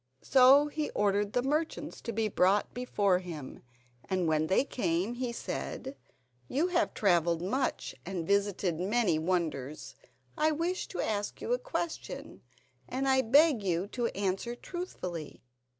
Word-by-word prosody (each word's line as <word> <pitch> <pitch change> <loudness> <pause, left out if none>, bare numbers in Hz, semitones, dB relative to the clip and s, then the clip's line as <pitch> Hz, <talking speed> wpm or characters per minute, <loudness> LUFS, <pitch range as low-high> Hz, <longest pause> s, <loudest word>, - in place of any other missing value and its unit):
So 270 +2 +7
he 300 0 -3
ordered 205 0 +1
the 245 - +1
merchants 300 +1 -2
to 235 - -4
be 220 0 0
brought 195 0 +2
before 205 -7 +1
him, 160 -7 -8 0.5
and 185 -3 +1
when 155 0 +2
they 190 - +3
came 195 -5 -1
he 245 0 -3
said: 265 +3 -5 0.5
"You 315 +7 +1
have 350 -1 +1
travelled 170 -4 +2
much 255 +8 -1
and 180 -2 -4
visited 200 -3 +1
many 195 -3 +2
wonders. 155 -5 -2 0.4
I 310 0 +2
wish 345 +4 -2
to - - -4
ask 205 -1 -2
you 485 - -1
a - - +1
question, 310 - -5 0.5
and 270 +1 -1
I 265 0 +4
beg 280 +1 +5
you 180 -2 0
to 240 0 -1
answer 200 +4 -1
truthfully. 185 - -6
210 Hz, 145 wpm, -30 LUFS, 180-270 Hz, 0.5 s, So